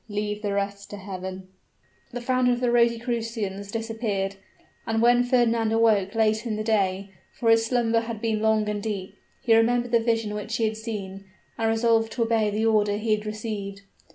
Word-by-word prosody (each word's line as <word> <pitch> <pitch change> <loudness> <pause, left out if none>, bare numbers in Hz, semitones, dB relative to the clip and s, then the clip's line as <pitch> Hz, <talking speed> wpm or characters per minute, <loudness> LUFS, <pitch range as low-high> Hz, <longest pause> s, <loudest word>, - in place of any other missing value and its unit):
Leave 210 0 -3
the 205 -2 -2
rest 200 0 -3
to 205 - -7
Heaven." 190 -1 -7 0.6
The 245 -1 -5
founder 255 0 +2
of 240 - -2
the 245 -1 +1
Rosicrucians 230 -4 0
disappeared: 220 -4 -2 0.5
and 225 0 0
when 240 +1 +5
Fernand 235 -3 +2
awoke 220 -3 +2
late 220 0 +2
in 220 - -1
the 215 - -3
day 200 -3 0 0.3
for 230 -2 +3
his 225 0 +4
slumber 230 -2 +2
had 230 -1 -5
been 220 -1 -1
long 220 -1 +2
and 210 -1 -2
deep 200 -2 -4 0.3
he 230 - +4
remembered 240 +1 +2
the 235 - +4
vision 225 -2 0
which 210 +2 -4
he 230 - -1
had 220 0 0
seen, 200 -4 -6 0.3
and 225 -1 0
resolved 225 0 +2
to 235 - 0
obey 225 -2 +1
the 215 +2 -1
order 210 -2 +2
he 215 0 0
had 210 0 -7
received. 210 -2 -5
220 Hz, 185 wpm, -25 LUFS, 205-230 Hz, 0.6 s, when